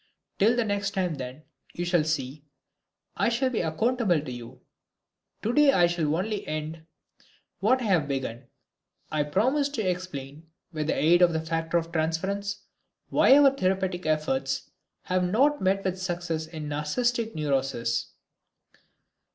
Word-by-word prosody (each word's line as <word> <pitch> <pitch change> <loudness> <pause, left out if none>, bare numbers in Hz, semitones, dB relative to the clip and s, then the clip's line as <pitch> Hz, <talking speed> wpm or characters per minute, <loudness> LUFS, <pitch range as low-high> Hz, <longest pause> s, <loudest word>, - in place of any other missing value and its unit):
Till 220 +4 +4
the 240 -2 +1
next 205 -1 -2
time, 180 -3 0
then. 130 +1 -7 0.3
You 175 - -2
shall 175 -2 +2
see, 150 -2 -3 0.7
I - - +2
shall 255 +2 0
be 230 - 0
accountable 200 +2 +1
to 145 -3 -6
you. 120 -1 -9 0.8
Today 275 +5 +4
I 175 - +5
shall 165 -3 0
only 205 +4 -2
end 155 +1 -5 0.7
what 250 +7 +3
I - - -2
have 180 -9 +2
begun. 130 -3 -4 0.6
I 155 - +1
promised 260 - +1
to 220 - -1
explain, 160 -4 -5 0.3
with 155 -1 -2
the - - +1
aid 175 +3 +4
of 175 -1 +5
the 160 - 0
factor 165 +1 0
of 165 0 -3
transference, 190 +5 -2 0.5
why 270 - +6
our 285 -2 +7
therapeutic 185 -4 -1
efforts 135 -3 -1 0.3
have 185 0 0
not 265 +11 +2
met 195 +1 +1
with 185 0 -2
success 175 -3 -3
in 160 -2 -7
narcistic 225 +11 -1
neuroses. 135 -6 -1
175 Hz, 145 wpm, -27 LUFS, 150-200 Hz, 0.8 s, our